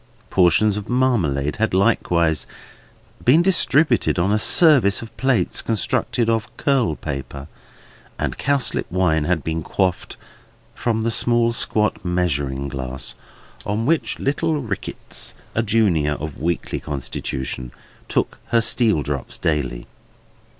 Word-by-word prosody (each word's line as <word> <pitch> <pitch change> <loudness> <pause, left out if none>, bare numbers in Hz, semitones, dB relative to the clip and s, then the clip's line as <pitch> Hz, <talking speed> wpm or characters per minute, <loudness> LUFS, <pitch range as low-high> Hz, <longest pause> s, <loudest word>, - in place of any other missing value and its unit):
Portions 95 +3 +3
of 105 0 -6
marmalade 90 - +1
had 110 -3 0
likewise 85 -6 +1 0.8
been 155 +8 +5
distributed 155 - +2
on 90 +3 +1
a 105 - +2
service 125 - +5
of 115 - -12
plates 130 -9 +1
constructed 115 +1 -1
of 115 -1 0
curlpaper; 75 - -2 0.7
and - - -2
cowslip 140 -9 0
wine 85 -4 +1
had 85 -3 0
been 80 0 -2
quaffed 90 +2 -2 0.6
from 110 -2 -1
the 115 - 0
small 120 0 +2
squat 105 -2 +1
measuring 70 -7 -1
glass 65 -1 -5 0.5
in 105 +3 -2
which 160 +3 0
little 150 +3 0
Rickitts 110 -8 -4 0.2
(a 110 - +1
junior 100 -9 +2
of 75 -1 -6
weakly 85 0 -2
constitution) 65 -3 -4 0.4
took - - -1
her 115 - +3
steel 110 - +2
drops 70 -1 -4
daily. 70 -6 -2
95 Hz, 120 wpm, -21 LUFS, 75-115 Hz, 0.8 s, been